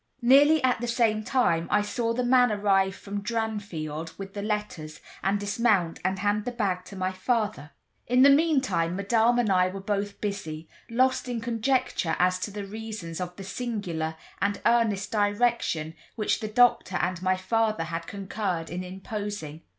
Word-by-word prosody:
Nearly 285 Hz, +5 st, +6 dB
at 250 Hz, -2 st, +2 dB
the 240 Hz, -, -2 dB
same 230 Hz, -2 st, +1 dB
time 210 Hz, -10 st, +1 dB
I 210 Hz, 0 st, +3 dB
saw 230 Hz, +3 st, -1 dB
the 250 Hz, +2 st, -1 dB
man 245 Hz, -1 st, +4 dB
arrive 195 Hz, -2 st, +2 dB
from 200 Hz, 0 st, -6 dB
Dranfield 200 Hz, -8 st, -4 dB
with 195 Hz, 0 st, -8 dB
the 205 Hz, -, -4 dB
letters, 205 Hz, -7 st, -4 dB, 0.2 s
and 200 Hz, +1 st, +1 dB
dismount 205 Hz, -4 st, +1 dB
and 190 Hz, +1 st, 0 dB
hand 205 Hz, +1 st, 0 dB
the 245 Hz, -, -2 dB
bag 195 Hz, -6 st, -1 dB
to 200 Hz, -, -10 dB
my 185 Hz, 0 st, -1 dB
father. 190 Hz, -, -1 dB, 0.4 s
In 250 Hz, +2 st, +5 dB
the 280 Hz, -, +8 dB
meantime, 275 Hz, -, +2 dB
Madame 225 Hz, +4 st, +2 dB
and 235 Hz, -4 st, +2 dB
I 185 Hz, -1 st, +4 dB
were 190 Hz, +1 st, -5 dB
both 200 Hz, 0 st, -3 dB
busy, 165 Hz, -7 st, -4 dB, 0.2 s
lost 255 Hz, +2 st, +1 dB
in 240 Hz, -2 st, -2 dB
conjecture 235 Hz, -, 0 dB
as 185 Hz, 0 st, +2 dB
to 195 Hz, -, -3 dB
the 205 Hz, 0 st, -6 dB
reasons 210 Hz, -5 st, -6 dB
of 180 Hz, 0 st, -5 dB
the 195 Hz, -, -8 dB
singular 190 Hz, -7 st, -3 dB, 0.3 s
and 200 Hz, 0 st, 0 dB
earnest 225 Hz, -4 st, +2 dB
direction 205 Hz, -6 st, +1 dB, 0.2 s
which 215 Hz, -2 st, 0 dB
the 220 Hz, -, -4 dB
doctor 235 Hz, -3 st, +3 dB
and 180 Hz, -1 st, -1 dB
my 185 Hz, 0 st, +1 dB
father 215 Hz, 0 st, 0 dB
had 165 Hz, +1 st, -5 dB
concurred 195 Hz, -4 st, -3 dB
in 180 Hz, +1 st, -4 dB
imposing. 190 Hz, -4 st, -6 dB
205 Hz, 170 wpm, -27 LUFS, 185-230 Hz, 0.4 s, the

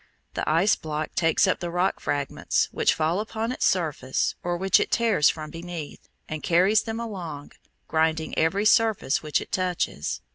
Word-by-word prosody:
The -, -, -2 dB
ice 170 Hz, +7 st, +4 dB
block 155 Hz, 0 st, -5 dB
takes 165 Hz, +1 st, +3 dB
up 185 Hz, -, +1 dB
the 175 Hz, -, -4 dB
rock 180 Hz, +2 st, 0 dB
fragments 145 Hz, -1 st, -1 dB
which -, -, +2 dB
fall 160 Hz, +4 st, 0 dB
upon 220 Hz, +2 st, -3 dB
its 255 Hz, -, +1 dB
surface 155 Hz, -8 st, 0 dB
or 175 Hz, 0 st, -2 dB
which 190 Hz, +1 st, +3 dB
it -, -, -1 dB
tears 225 Hz, -10 st, +3 dB
from 155 Hz, -1 st, -5 dB
beneath, 170 Hz, -2 st, -8 dB, 0.2 s
and 155 Hz, -1 st, -5 dB
carries 185 Hz, +5 st, +3 dB
them 225 Hz, 0 st, -5 dB
along, 175 Hz, -11 st, -6 dB, 0.4 s
grinding 160 Hz, 0 st, 0 dB
every 190 Hz, +6 st, +1 dB
surface 220 Hz, -8 st, +3 dB
which 150 Hz, -1 st, 0 dB
it -, -, -9 dB
touches. 180 Hz, -, -2 dB
175 Hz, 170 wpm, -25 LUFS, 155-195 Hz, 0.4 s, ice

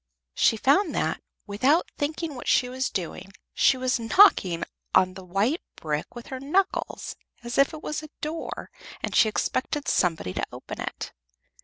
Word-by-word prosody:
She 225 Hz, -, +3 dB
found 285 Hz, -, +3 dB
that, -, -, -1 dB, 0.2 s
without 255 Hz, -, +2 dB
thinking 310 Hz, +1 st, -2 dB
what 245 Hz, -, -8 dB
she 250 Hz, -, +4 dB
was 260 Hz, +1 st, -2 dB
doing, 190 Hz, +1 st, -5 dB, 0.2 s
she 265 Hz, -, +4 dB
was 255 Hz, -1 st, 0 dB
knocking 225 Hz, -, +5 dB, 0.3 s
on 185 Hz, 0 st, +4 dB
the 190 Hz, -, -10 dB
white 200 Hz, -, 0 dB
brick 150 Hz, +4 st, -4 dB
with 240 Hz, -, -8 dB
her 260 Hz, -, -4 dB
knackles, 365 Hz, +9 st, -1 dB, 0.3 s
as 240 Hz, +2 st, -2 dB
if 275 Hz, -, +5 dB
it 310 Hz, -2 st, -9 dB
was 300 Hz, -, -3 dB
a 310 Hz, -, -10 dB
door 315 Hz, +2 st, -5 dB, 0.3 s
and -, -, -2 dB
she 220 Hz, -, +6 dB
expected 280 Hz, +6 st, -1 dB
somebody 165 Hz, -, +1 dB
to -, -, -2 dB
open -, -, -8 dB
it. -, -, -5 dB
255 Hz, 165 wpm, -26 LUFS, 195-300 Hz, 0.3 s, she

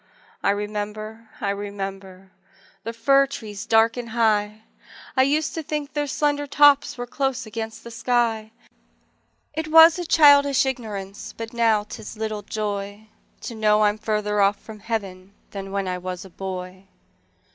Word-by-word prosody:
I -, -, +1 dB
remember, 210 Hz, +2 st, -4 dB
I 200 Hz, -2 st, 0 dB
remember 195 Hz, -2 st, -7 dB, 0.5 s
The 225 Hz, -, -4 dB
fir 275 Hz, +4 st, +3 dB
trees 215 Hz, -7 st, -7 dB
dark 225 Hz, +1 st, +4 dB
and 240 Hz, -1 st, -5 dB
high; 215 Hz, -2 st, +1 dB, 0.5 s
I 260 Hz, -, +4 dB
used 295 Hz, +4 st, +1 dB
to 325 Hz, -, -3 dB
think 300 Hz, -1 st, -4 dB
their 295 Hz, -1 st, -1 dB
slender 290 Hz, +1 st, 0 dB
tops 285 Hz, -1 st, +4 dB
Were 245 Hz, -, -4 dB
close 265 Hz, 0 st, -2 dB
against 220 Hz, 0 st, -6 dB
the 235 Hz, -, -9 dB
sky: 230 Hz, -2 st, 0 dB, 1.0 s
It 315 Hz, +1 st, -3 dB
was 325 Hz, +2 st, +7 dB
a 350 Hz, -, -3 dB
childish 285 Hz, -4 st, +6 dB
ignorance, 210 Hz, -7 st, -5 dB
But 225 Hz, 0 st, -6 dB
now 225 Hz, -3 st, +2 dB
'tis 215 Hz, +1 st, -9 dB
little 215 Hz, -1 st, -3 dB
joy 205 Hz, 0 st, -5 dB, 0.3 s
To -, -, -6 dB
know 215 Hz, -1 st, +3 dB
I'm 210 Hz, +1 st, +2 dB
farther 210 Hz, -1 st, 0 dB
off 200 Hz, +1 st, +3 dB
from 220 Hz, -1 st, -11 dB
Heaven 200 Hz, -3 st, -5 dB, 0.2 s
Than 195 Hz, -1 st, -7 dB
when 195 Hz, -1 st, -2 dB
I 180 Hz, 0 st, -2 dB
was 185 Hz, +1 st, -6 dB
a 190 Hz, -, -13 dB
boy. 185 Hz, 0 st, -7 dB
220 Hz, 155 wpm, -23 LUFS, 205-255 Hz, 1.0 s, was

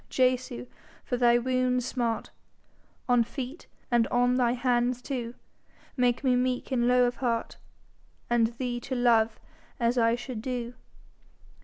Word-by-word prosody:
Jesu, 255 Hz, -, 0 dB, 0.4 s
for 250 Hz, -, -1 dB
thy 240 Hz, -1 st, +4 dB
wounds' 250 Hz, 0 st, 0 dB
smart, 240 Hz, -3 st, -2 dB, 0.8 s
On 245 Hz, -2 st, +4 dB
feet 265 Hz, +6 st, -7 dB, 0.2 s
and 235 Hz, -1 st, +3 dB
on 245 Hz, 0 st, +2 dB
thine 250 Hz, -1 st, +2 dB
hands 245 Hz, 0 st, +1 dB
two, 245 Hz, -2 st, -5 dB, 0.6 s
Make 250 Hz, 0 st, +1 dB
me 255 Hz, -2 st, +3 dB
meek 250 Hz, +1 st, -1 dB
and 240 Hz, -2 st, +2 dB
low 250 Hz, 0 st, +5 dB
of 245 Hz, -, -2 dB
heart, 235 Hz, -3 st, -2 dB, 0.7 s
And 235 Hz, -1 st, +3 dB
thee 240 Hz, +1 st, -4 dB
to 260 Hz, +2 st, -5 dB
love 230 Hz, -2 st, +3 dB, 0.4 s
as 240 Hz, +1 st, +2 dB
I 230 Hz, 0 st, +3 dB
should 240 Hz, -2 st, -6 dB
do. 245 Hz, -1 st, -4 dB
245 Hz, 140 wpm, -28 LUFS, 235-255 Hz, 0.8 s, low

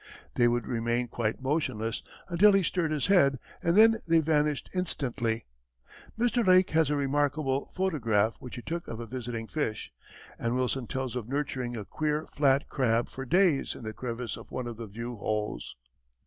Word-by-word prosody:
They 120 Hz, -, +4 dB
would 120 Hz, -1 st, +1 dB
remain 120 Hz, 0 st, -1 dB
quite 115 Hz, +2 st, -2 dB
motionless 130 Hz, -6 st, -1 dB, 0.3 s
until 195 Hz, +4 st, +5 dB
he 195 Hz, -1 st, +4 dB
stirred 170 Hz, -1 st, 0 dB
his 150 Hz, -3 st, 0 dB
head, 140 Hz, -9 st, +4 dB, 0.2 s
and 170 Hz, +3 st, +2 dB
then 225 Hz, +1 st, +7 dB
they 165 Hz, 0 st, +5 dB
vanished 150 Hz, -2 st, +1 dB
instantly. 130 Hz, -10 st, -1 dB, 0.7 s
Mr. 240 Hz, 0 st, +2 dB
Lake 185 Hz, -1 st, +5 dB
has 160 Hz, -2 st, +3 dB
a 150 Hz, -, +1 dB
remarkable 140 Hz, 0 st, 0 dB
photograph 115 Hz, -, +1 dB
which 125 Hz, -, -8 dB
he 120 Hz, -, -7 dB
took 170 Hz, +1 st, -4 dB
of 115 Hz, -, -6 dB
a 120 Hz, -, -5 dB
visiting 120 Hz, -1 st, -5 dB
fish, 110 Hz, -4 st, -3 dB, 0.5 s
and 115 Hz, +1 st, -1 dB
Wilson 130 Hz, -1 st, -1 dB
tells 130 Hz, -2 st, -3 dB
of 120 Hz, -2 st, -4 dB
nurturing 130 Hz, -4 st, -2 dB
a 105 Hz, -, -5 dB
queer 155 Hz, +4 st, -1 dB
flat 140 Hz, -1 st, +2 dB
crab 120 Hz, -3 st, +1 dB
for 135 Hz, -, -7 dB
days 175 Hz, 0 st, +3 dB
in -, -, -10 dB
the 110 Hz, 0 st, -5 dB
crevice 120 Hz, -1 st, -4 dB
of -, -, -12 dB
one 130 Hz, -, -4 dB
of 120 Hz, -2 st, -6 dB
the 115 Hz, -1 st, -6 dB
view 115 Hz, +4 st, -6 dB
holes. 105 Hz, -, -3 dB
130 Hz, 175 wpm, -29 LUFS, 115-155 Hz, 0.7 s, then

